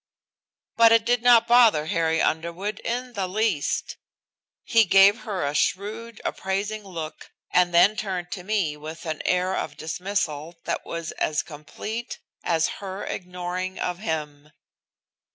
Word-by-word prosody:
But 230 -1 +7
it 230 0 +5
did 240 0 +2
not 240 -1 +6
bother 230 -10 +5
Harry 160 0 +1
Underwood 170 +6 -2
in 250 +1 -3
the 195 -4 -2
least. 195 -6 -1 0.7
He 230 -1 +4
gave 195 +3 +6
her 200 -9 -3
a 145 - -1
shrewd 215 +8 -1
appraising 200 +3 -2
look 165 -5 -7 0.2
and 180 -1 +4
then 175 +5 +5
turned 185 -4 -4
to 180 -1 -5
me 190 -7 0
with 155 +3 -9
an 155 -2 -3
air 180 +1 +1
of 145 -1 -4
dismissal 165 -2 -3
that - - -3
was 170 -1 -4
as 155 -1 +1
complete 190 +10 -7 0.3
as 165 -2 +2
her 195 0 -5
ignoring 180 0 -4
of 180 -1 -3
him. 150 -5 -4
185 Hz, 140 wpm, -25 LUFS, 160-215 Hz, 0.7 s, But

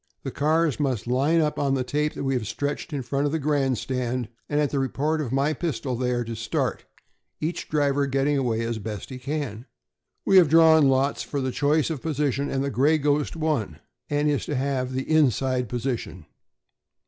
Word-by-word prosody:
The - - -4
cars 155 0 +1
must 130 -7 -1
line 140 +7 +2
up 150 -1 -1
on 140 -1 +1
the 130 - 0
tape 150 +4 -1
that - - -4
we 135 0 0
have 120 -5 -2
stretched 145 +8 -3
in 140 -3 -3
front 140 +3 0
of - - -2
the 160 - 0
grandstand, 130 -4 -1 0.2
and 145 - +1
at 150 -2 +1
the 140 - 0
report 150 +4 0
of 130 -6 -4
my 140 +3 +1
pistol 135 -5 -3
they 125 +1 -1
are 120 -1 0
to 115 0 -6
start, 110 0 -2 0.5
each 165 +3 -3
driver 145 -2 +1
getting 140 +2 +1
away 120 -5 0
as 115 -1 -2
best 105 +4 -6
he 130 - -6
can. 135 -4 -4 0.6
We 195 - +5
have 175 -5 +7
drawn 160 -2 +6
lots 135 +2 +1
for 145 - -3
the 130 -1 -1
choice 150 +4 +1
of 150 -5 -4
position, 145 -3 -1
and 135 0 -1
the 140 - -2
'Gray 145 +7 +3
Ghost' 145 +1 0
won, 150 - -1 0.3
and 145 0 +1
is 145 -2 +1
to 150 - -2
have 130 -1 -1
the 130 +1 -1
inside 130 -5 +2
position. 120 - -4
140 Hz, 200 wpm, -25 LUFS, 125-150 Hz, 0.6 s, have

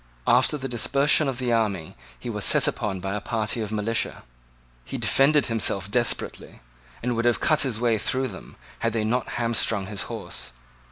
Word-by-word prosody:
After 125 +5 +4
the 135 -1 -5
dispersion 140 +5 +3
of 135 -2 -2
the 125 -2 0
army 100 -8 -1 0.2
he - - -8
was - - -3
set - - +4
upon 95 -3 -2
by 95 +1 -3
a 105 - -3
party 115 +1 -2
of 105 -1 -4
militia. 110 +1 -1 0.6
He - - -6
defended 145 +1 +3
himself 100 -4 0
desperately, 120 +1 -1 0.4
and 120 0 0
would 115 +1 -1
have 120 - +3
cut 155 -2 +2
his 130 -5 +1
way 115 -2 +1
through 130 +4 -1
them, - - -11 0.2
had 115 -1 -1
they 115 -2 0
not 120 +3 -1
hamstringed 115 -4 +1
his 105 -2 -4
horse. 60 0 -5
115 Hz, 180 wpm, -25 LUFS, 105-125 Hz, 0.6 s, After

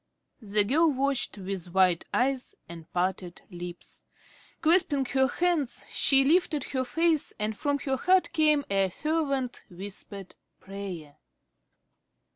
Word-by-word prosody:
The 210 -1 +2
girl 305 +9 +3
watched 275 -3 0
with 190 -2 -6
wide 185 -3 +3
eyes 260 0 -1
and 165 -1 -11
parted 180 0 -2
lips. 175 0 -9 0.6
Clasping 310 -5 +3
her 265 +1 +2
hands, 330 -2 -1
she 270 -1 +4
lifted 310 -2 +2
her 260 -1 -1
face 320 +4 0
and 215 0 -2
from 285 +6 -1
her 270 -1 -2
heart 365 +1 +2
came 305 -3 +3
a 195 -1 +2
fervent, 275 - -2
whispered 195 +1 -8 0.3
prayer. 185 -7 -8
255 Hz, 120 wpm, -27 LUFS, 190-295 Hz, 0.6 s, she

